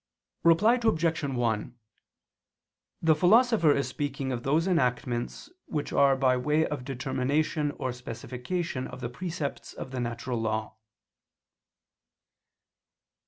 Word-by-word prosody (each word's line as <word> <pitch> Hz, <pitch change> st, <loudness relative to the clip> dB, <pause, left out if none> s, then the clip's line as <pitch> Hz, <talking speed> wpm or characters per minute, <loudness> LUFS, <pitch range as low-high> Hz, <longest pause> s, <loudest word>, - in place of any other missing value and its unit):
Reply 210 Hz, +9 st, +5 dB
Obj. 165 Hz, -8 st, +1 dB
1: 120 Hz, -3 st, -1 dB, 1.2 s
The 160 Hz, -1 st, +6 dB
Philosopher 210 Hz, 0 st, +5 dB
is 140 Hz, -2 st, 0 dB
speaking 135 Hz, 0 st, -3 dB
of 120 Hz, -2 st, -2 dB
those 150 Hz, +6 st, +1 dB
enactments 125 Hz, -, -1 dB, 0.2 s
which 150 Hz, -2 st, -3 dB
are 140 Hz, -1 st, +5 dB
by 130 Hz, -1 st, +3 dB
way 150 Hz, +5 st, +2 dB
of 145 Hz, -4 st, -4 dB
determination 140 Hz, +3 st, -1 dB
or 130 Hz, -, -2 dB
specification 130 Hz, +5 st, -4 dB
of -, -, -9 dB
the 120 Hz, -, -3 dB
precepts 160 Hz, +1 st, -5 dB
of 130 Hz, -, -8 dB
the 130 Hz, -, -3 dB
natural 120 Hz, 0 st, -3 dB
law. 110 Hz, -1 st, -2 dB
140 Hz, 115 wpm, -28 LUFS, 125-160 Hz, 1.2 s, The